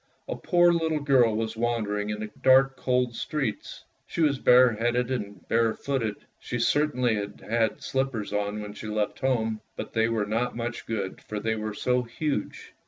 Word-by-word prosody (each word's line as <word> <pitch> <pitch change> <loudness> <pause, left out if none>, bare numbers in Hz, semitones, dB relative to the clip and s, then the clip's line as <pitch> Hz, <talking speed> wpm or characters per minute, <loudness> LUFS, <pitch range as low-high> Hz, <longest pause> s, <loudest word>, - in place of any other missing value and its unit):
A - - -3
poor 175 -1 +4
little 160 -2 0
girl 130 -6 +4
was 110 0 -2
wandering 110 -3 -1
in 105 0 -3
the 110 -1 -5
dark 135 +1 +5
cold 125 -2 0
streets; 140 -8 -3 0.2
she - - -3
was 145 -4 +3
bareheaded 125 0 +4
and 100 -7 -5
barefooted. 115 0 0 0.2
She 120 - -4
certainly 125 -1 +2
had 100 0 -5
had 115 0 0
slippers 130 -6 -2
on 105 +1 -1
when 105 0 -7
she 110 - -8
left 105 -1 -2
home, 110 -5 0
but - - -6
they 115 0 +2
were 110 -2 0
not 115 +4 -1
much 120 0 -4
good, 100 -4 -3
for 105 - -5
they 110 +2 0
were 110 -1 -4
so 125 +3 +1
huge. 125 -1 -4
115 Hz, 170 wpm, -27 LUFS, 105-130 Hz, 0.2 s, dark